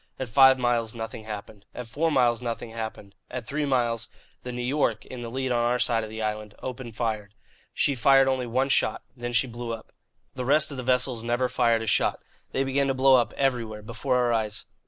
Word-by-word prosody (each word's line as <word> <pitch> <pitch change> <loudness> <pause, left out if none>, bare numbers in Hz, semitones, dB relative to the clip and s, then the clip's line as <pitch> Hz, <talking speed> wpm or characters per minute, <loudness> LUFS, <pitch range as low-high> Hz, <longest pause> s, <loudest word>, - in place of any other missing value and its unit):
At 130 -3 -4
five 135 +3 +7
miles 120 -2 0
nothing 115 -1 -6
happened; 105 -1 -8
at 125 - -5
four 145 +9 0
miles 120 -4 +3
nothing 115 -1 -4
happened; 110 -3 -6 0.2
at - - -5
three 145 +4 -2
miles, 120 -4 +1 0.3
the 125 - -6
New 125 0 -4
York, 140 +4 0
in 125 -1 -8
the 120 - -5
lead 130 +1 -2
on 120 -1 +2
our 120 +1 +2
side 115 -2 +2
of 110 - -6
the 110 0 -5
island, 105 -1 -3
opened 125 -3 -7
fire. 110 -3 -2 0.4
She 140 - +1
fired 135 +1 +5
only 130 -2 0
one 130 +4 +1
shot. - - +1
Then 120 -1 -4
she 120 - +3
blew 120 -1 -5
up. 115 - -9 0.4
The 130 - -4
rest 150 +4 +3
of 140 - -6
the - - -3
vessels 125 -2 0
never 120 +2 +1
fired 115 -2 +2
a - - -4
shot. - - +2 0.3
They 135 - +1
began 135 +1 +1
to 135 - 0
blow 135 +1 +5
up, 120 -3 +4
everywhere, 115 -6 -1
before 120 +4 -2
our 120 -1 +2
eyes. 110 -2 -2
120 Hz, 220 wpm, -26 LUFS, 115-130 Hz, 0.4 s, five